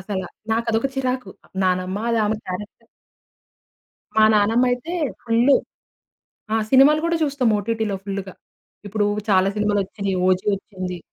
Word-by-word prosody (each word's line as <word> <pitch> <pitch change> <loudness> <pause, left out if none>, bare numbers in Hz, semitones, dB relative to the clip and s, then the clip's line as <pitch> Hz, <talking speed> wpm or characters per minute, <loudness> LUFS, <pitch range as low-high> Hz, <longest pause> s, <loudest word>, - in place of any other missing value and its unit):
అసల. 190 0 -4 0.3
నాకు 230 +1 0
అదొక 225 +5 +1
చిరాకు 255 -6 -2 0.3
నానమ్మ 185 +1 0
అది 230 - +1
ఆమె 215 +1 0
క్యారెక్టర్ 210 +5 -7 1.3
మా 220 - +6
నానమ్మయితే 245 +8 +2 0.3
ఫుల్లు. 240 +4 +4 1.0
ఆ! - - +3 0.2
సినిమాలు 275 +3 +6
గూడా 335 0 +1
చూస్తాం 280 -5 +1
ఓటిటిలో 220 -1 -2
ఫుల్లుగా. 195 -1 -5 0.5
ఇప్పుడు 205 +1 0 0.2
చాలా 190 -1 +4
సినిమాలు 210 -1 +1
వచ్చిని 200 0 -4
'ఓజీ' 185 +2 +2
వచ్చింది. 185 -2 -6
210 Hz, 125 wpm, -22 LUFS, 195-245 Hz, 1.3 s, మా